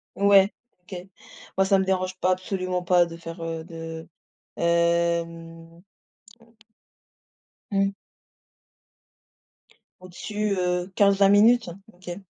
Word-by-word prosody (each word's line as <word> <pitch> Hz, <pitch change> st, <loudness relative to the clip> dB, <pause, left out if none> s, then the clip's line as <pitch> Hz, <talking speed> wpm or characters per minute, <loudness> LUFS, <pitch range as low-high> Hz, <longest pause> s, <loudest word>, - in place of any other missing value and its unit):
Ouais. 200 Hz, 0 st, +5 dB, 0.3 s
OK. 185 Hz, -, -13 dB, 0.6 s
Moi 190 Hz, -, +4 dB
ça 195 Hz, 0 st, +3 dB
me 190 Hz, -, 0 dB
dérange 185 Hz, -1 st, -1 dB
pas 185 Hz, -, +2 dB
absolument 185 Hz, -1 st, -2 dB
pas 175 Hz, -1 st, +4 dB
de 165 Hz, 0 st, -9 dB
faire 165 Hz, 0 st, -9 dB
heu, 165 Hz, -1 st, -4 dB
de 165 Hz, -1 st, -8 dB, 0.5 s
hem 170 Hz, 0 st, -1 dB, 1.9 s
Mmh. 195 Hz, 0 st, +1 dB, 2.1 s
Au-dessus, 205 Hz, +3 st, -3 dB
heu, 180 Hz, 0 st, -1 dB
15-20 200 Hz, -1 st, +4 dB
minutes? 225 Hz, +3 st, +4 dB, 0.2 s
OK. 175 Hz, -1 st, -9 dB
180 Hz, 100 wpm, -24 LUFS, 170-195 Hz, 2.1 s, Ouais